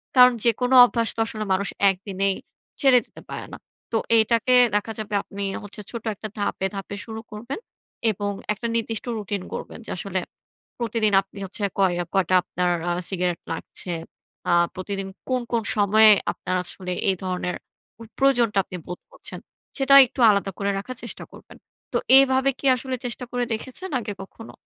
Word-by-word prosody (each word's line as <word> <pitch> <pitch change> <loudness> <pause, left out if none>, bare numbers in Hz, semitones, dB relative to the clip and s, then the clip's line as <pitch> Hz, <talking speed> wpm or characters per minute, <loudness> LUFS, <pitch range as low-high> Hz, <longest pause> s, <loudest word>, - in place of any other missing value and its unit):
কারণ 250 -1 +8
যেকোনো 245 +2 +2
অভ্যাস 230 -1 0
তো - - -7
আসলে 215 -1 -4
মানুষ 195 +1 0 0.2
১ 195 - +1
দিনেই 195 0 0 0.5
ছেড়ে 265 -3 +6
দিতে - - -15
পারে - - -5
না। - - -6 0.3
তো 225 - +2 0.2
এইটাকে 230 +3 +3 0.2
দেখা 210 +2 0
যাবে 215 -1 -6
আপনি 200 - -9 0.2
হচ্ছে 205 +1 -8
ছোট 235 -2 -6
একটা 215 - -6
ধাপে, 200 -1 -1
ধাপে 195 +1 -5
শুরু 220 -1 -7
করবেন 235 - -6 0.5
এবং 205 0 -3 0.2
একটা 225 +3 -4
নির্দিষ্ট 225 -1 -2
রুটিন 205 -2 -3
করবেন। - - -6
যে - - -6
আসলে 190 0 -2 0.6
প্রতিদিন 225 -3 0
আপনি 195 +1 -15
হচ্ছে 200 +3 -7 0.2
কয় 190 -2 +3
আ - - -5
কয়টা 185 -1 +2
আপনার 180 0 -1 0.2
আ - - +2 0.2
সিগারেট 180 -2 -1
লাগছে? 175 +2 -6 0.6
আ - - +3 0.2
প্রতিদিন 195 +1 -4 0.2
কোন, 255 -1 +1
কোন 230 -1 +1
সময়ে 215 +1 +6 0.2
আপনার 185 +1 -3
আসলে 180 0 -5 0.2
এই 190 - +2
ধরনের 180 -1 -2 0.4
ওই 230 - -9
প্রয়োজনটা 240 -6 +3
আপনি 185 - -8
বোধ 180 - -7
করছেন? - - -9 0.4
সেটা 275 -1 +4
একটু 250 - -8
আলাদা 200 -1 +1
করে 200 0 0
রাখার 255 +6 -6
চেষ্টা - - -7
করবেন। - - -14 0.4
তো - - +2 0.2
এভাবে 265 0 +4
কী - - -5
আসলে 260 +1 -3
চেষ্টা 245 +1 -4
করে 245 0 -1
দেখেছেন 260 +12 -5
আগে 210 -2 -5
কখনো? 225 +4 -12
215 Hz, 175 wpm, -24 LUFS, 195-240 Hz, 0.6 s, কারণ